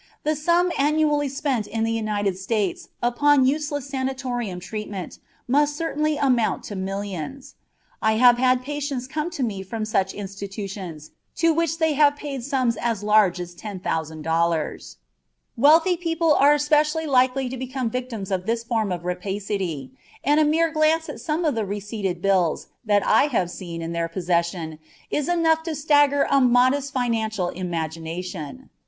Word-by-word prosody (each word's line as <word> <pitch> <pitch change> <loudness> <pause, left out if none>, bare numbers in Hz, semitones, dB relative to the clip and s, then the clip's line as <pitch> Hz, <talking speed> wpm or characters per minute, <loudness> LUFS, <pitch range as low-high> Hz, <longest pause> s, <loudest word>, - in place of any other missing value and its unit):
The 310 +1 +1
sum 345 +4 +2
annually 295 0 +2
spent 265 -5 -1
in 225 +1 -2
the 225 - 0
United 210 -3 -1
States 195 0 -2
upon 270 +3 +4
useless 290 0 -1
sanatorium 260 -7 -3
treatment 200 -1 -6 0.3
must 290 +3 +2
certainly 305 -2 -1
amount 250 -6 +1
to 205 - -7
millions. 195 - -5 0.5
I 220 - +3
have 240 +2 +5
had 255 0 +3
patients 285 -2 -3
come 305 +5 -3
to 340 -7 -3
me 205 -5 -2
from 215 +3 -4
such 195 -3 0
institutions 195 -5 -7 0.2
to 330 0 +3
which 330 0 0
they 320 -2 +2
had 290 0 +4
paid 280 -4 -6
sums 255 -4 0
as 230 -4 -2
large 210 -4 +4
as 175 0 -6
$10,000. 165 -4 -2 0.6
Wealthy 320 +8 +5
people 330 -2 +1
are 290 +1 +5
specially 300 +2 +2
likely 260 -1 +2
to 255 - -5
become 260 -2 -3
victims 235 -6 -4
of 185 0 -2
this 230 0 0
form 225 -4 -1
of 175 -1 -4
rapacity, 190 - -3 0.3
and 295 +2 +3
a - - +5
mere 320 +2 +2
glance 310 +1 +2
at - - -7
some 325 +2 -1
of 300 - +2
the 225 -2 -1
receipted 200 -3 -4
bills 185 -5 +1
that 205 -3 +2
I - - +5
have 185 -11 0
seen 170 -2 -6
in 165 - -4
their 170 0 -1
possession 170 -2 -2 0.3
is 295 +1 -1
enough 325 -2 +3
to 325 -1 -4
stagger 290 -1 +3
a 275 -1 +5
modest 255 +3 +3
financial 220 -7 -1
imagination. 170 - -5
240 Hz, 155 wpm, -23 LUFS, 190-290 Hz, 0.6 s, have